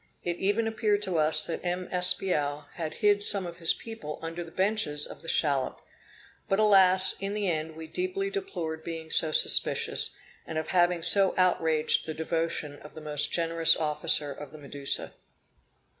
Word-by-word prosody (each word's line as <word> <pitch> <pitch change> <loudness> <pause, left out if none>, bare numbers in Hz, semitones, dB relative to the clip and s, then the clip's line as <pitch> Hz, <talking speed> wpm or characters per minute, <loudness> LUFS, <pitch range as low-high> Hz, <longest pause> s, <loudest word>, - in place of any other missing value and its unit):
It 175 0 -3
even 205 +5 0
appeared 215 -2 0
to 180 -5 -1
us 155 0 +2
that 165 - -5
M. 180 +1 -3
Espiau 180 -5 0
had 160 -2 -5
hid 205 0 +4
some 200 -2 +4
of 170 -1 -8
his 165 -2 +2
people 225 -10 -8
under 165 +1 -5
the 165 - -12
benches 185 -5 0
of - - -10
the 165 - -13
shallop. 140 -5 0 0.7
But 195 - +2
alas; 190 -3 +6
in 195 +1 -4
the 210 -2 -1
end 160 -2 -3
we 160 0 -8
deeply 370 - -3
deplored 170 - -5
being 165 -1 -7
so 160 - +1
suspicious, - - +2 0.3
and 160 - -6
of 160 - -3
having 175 -2 +2
so 195 +2 +4
outraged 165 -5 +1
the 160 - -5
devotion 160 -2 -3
of 150 - -14
the 155 - -9
most 150 -1 -2
generous 165 -1 +3
officer 150 -1 0
of 140 +1 -9
the 155 - -11
Medusa. 140 -1 -3
165 Hz, 175 wpm, -27 LUFS, 155-195 Hz, 0.7 s, alas